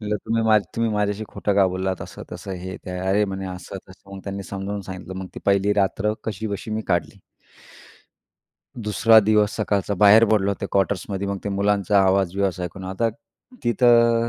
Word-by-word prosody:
म्हटलं, 105 -1 -2
"तुम्ही 110 -1 +3 0.2
तुम्ही 115 -1 +1
माझ्याशी 105 +1 -1
खोटं 100 - -1
का 100 -2 +5
बोललात, 95 0 -2
असं - - -9
तसं, 95 - -6
हे 95 +1 -6
ते?" 90 -1 -7
"अरे, 95 +3 +1 0.3
असं 90 +1 -9
तसं." 100 +1 -14
मग 95 - -8
त्यांनी 100 0 -5
समजावून 100 +1 -5
सांगितलं. 95 -1 -8
मग 95 - -5
ती - - -7
पहिली 100 +1 +3
रात्र 100 +1 +1
कशीबशी 110 0 -4
मी 110 +1 -2
काढली. 85 0 -1 1.6
दुसरा 110 +1 +5
दिवस 105 +1 +2
सकाळचा 100 -2 0
बाहेर 105 +4 +7
पडलो 100 -2 +2
ते 100 - -2
क्वार्टर्समध्ये. 100 0 -1
मग 100 -1 -2
ते 100 - -1
मुलांचा 100 0 +1
आवाज 95 -1 +2
बिवाज 95 -2 -1
ऐकून, 90 +2 -6
आता 95 +5 -1 0.6
तिथं 115 0 +4
100 Hz, 170 wpm, -23 LUFS, 95-105 Hz, 1.6 s, बाहेर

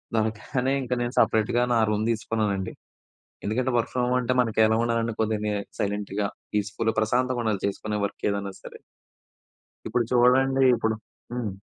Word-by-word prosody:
దొరగ్గనే 115 +5 0
ఇంకా 125 -1 -1
నేను 120 +1 -2
సెపరేట్‌గా 110 +2 +3
నా 115 - +3
రూమ్ 105 0 0
తీసుకున్నానండి. 110 -4 -1 0.7
ఎందుకంటే 125 +5 0
వర్క్ 115 - 0
ఫ్రమ్ 125 -1 +1
హోమ్ 125 +1 +1
అంటే 125 0 0
మనకి 110 -2 +1
ఎలా 110 0 +2
ఉండాలంటే, 115 -1 0
కొద్దిగా 110 -1 0
ని 105 - 0 0.3
సైలెంట్‌గా 100 0 -1 0.3
పీస్‌ఫుల్‌గా 105 +2 0
ప్రశాంతంగా 125 +2 +1
ఉండాలి 105 -3 0
చేసుకునే 105 +1 -3
వర్క్ 100 - -5
ఏదైనా 100 -1 -3
సరే. - - -10 1.1
ఇప్పుడు 120 +2 +1
చూడండి. 130 +2 +4
ఇప్పుడు 110 -1 0 0.4
హ్మ్. 115 -5 -2
110 Hz, 150 wpm, -26 LUFS, 105-125 Hz, 1.1 s, చూడండి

